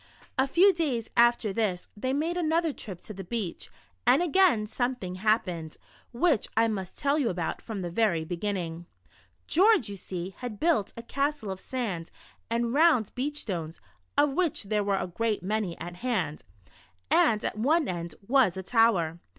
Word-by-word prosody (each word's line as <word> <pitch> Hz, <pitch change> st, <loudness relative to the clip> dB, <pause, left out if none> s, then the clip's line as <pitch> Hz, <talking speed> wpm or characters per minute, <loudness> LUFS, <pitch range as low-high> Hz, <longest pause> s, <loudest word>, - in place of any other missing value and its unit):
A 265 Hz, 0 st, +2 dB
few 375 Hz, +8 st, +5 dB
days 275 Hz, -10 st, -2 dB
after 235 Hz, -3 st, +4 dB
this, 190 Hz, -5 st, -1 dB
they 255 Hz, +5 st, -2 dB
made 315 Hz, +5 st, 0 dB
another 330 Hz, -2 st, +1 dB
trip 190 Hz, -9 st, -8 dB
to 215 Hz, -, -9 dB
the 195 Hz, -1 st, -7 dB
beach, 195 Hz, -1 st, -4 dB, 0.4 s
and 265 Hz, +7 st, +5 dB
again 350 Hz, -, +4 dB
something 245 Hz, -4 st, -2 dB
happened, 185 Hz, -5 st, -1 dB, 0.3 s
which 255 Hz, -, +2 dB
I 225 Hz, 0 st, +5 dB
must 195 Hz, -4 st, -4 dB
tell 285 Hz, +2 st, +1 dB
you 255 Hz, -6 st, +1 dB
about 175 Hz, -3 st, -3 dB
from 210 Hz, -5 st, -5 dB
the 175 Hz, -, -4 dB
ver}* 175 Hz, -5 st, +1 dB
beginning. 175 Hz, -2 st, -3 dB, 0.6 s
George, 380 Hz, -, +4 dB
you 200 Hz, -, -5 dB
see, 185 Hz, 0 st, -6 dB
had 245 Hz, -4 st, -6 dB
built 310 Hz, -, +2 dB
a 230 Hz, -, -6 dB
castle 275 Hz, -4 st, -2 dB
of 190 Hz, -, -6 dB
sand 200 Hz, -11 st, -4 dB, 0.4 s
and 235 Hz, +1 st, 0 dB
round 295 Hz, -, +4 dB
beach 290 Hz, +4 st, -2 dB
stones 165 Hz, -5 st, -5 dB, 0.4 s
(of 290 Hz, -1 st, +4 dB
which 335 Hz, -5 st, 0 dB
there 210 Hz, +1 st, 0 dB
were 200 Hz, -1 st, +1 dB
a 185 Hz, -, -1 dB
great 210 Hz, +4 st, -2 dB
many 205 Hz, -3 st, -2 dB
at 175 Hz, +1 st, -7 dB
hand), 185 Hz, -11 st, -2 dB, 0.7 s
and 215 Hz, -2 st, +4 dB
at -, -, -2 dB
one 295 Hz, +8 st, +2 dB
end 170 Hz, -3 st, -4 dB
was 245 Hz, -9 st, +3 dB
a 190 Hz, -, -4 dB
tower. 185 Hz, -8 st, +2 dB
220 Hz, 170 wpm, -28 LUFS, 185-270 Hz, 0.7 s, few